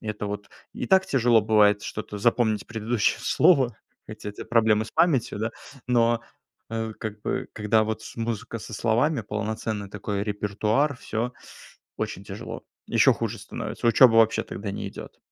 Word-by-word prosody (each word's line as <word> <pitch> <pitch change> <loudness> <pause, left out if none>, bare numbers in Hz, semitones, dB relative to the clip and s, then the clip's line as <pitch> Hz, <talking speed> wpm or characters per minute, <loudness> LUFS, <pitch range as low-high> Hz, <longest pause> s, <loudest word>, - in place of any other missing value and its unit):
Это 105 -1 -4
вот 105 0 -5 0.2
и - - -4
так 190 0 +4
тяжело 120 -3 +4
бывает 105 -1 +4
что-то 105 -1 -6
запомнить, 110 -1 +1
предыдущее 115 -1 0
слово, 130 - +3 0.3
эти 110 0 -8
у - - -6
тя - - -8
проблемы 110 -2 +3
с 110 - -11
памятью, 140 -12 +2
да. 110 +2 -1 0.4
Но, 120 -1 +3 0.5
э, 110 -1 -3
как 105 -1 -6
бы - - -2
когда 110 +1 +2
вот 110 0 -3
с - - -10
музыка 115 0 -3
со 115 - -10
словами, 120 +7 +1
полноценный 105 0 -3
такой 100 0 -3
репертуар- 105 +7 0
всё 115 +2 -3 0.7
очень 95 - -4
тяжело. 100 +1 -7 0.2
Ещё - - +5
хуже - - -3
становится. - - -5
Учёба 115 0 +7
вообще 115 0 +4
тогда 100 0 -6
не - - -4
идёт. - - -10
110 Hz, 160 wpm, -25 LUFS, 105-115 Hz, 0.7 s, Учёба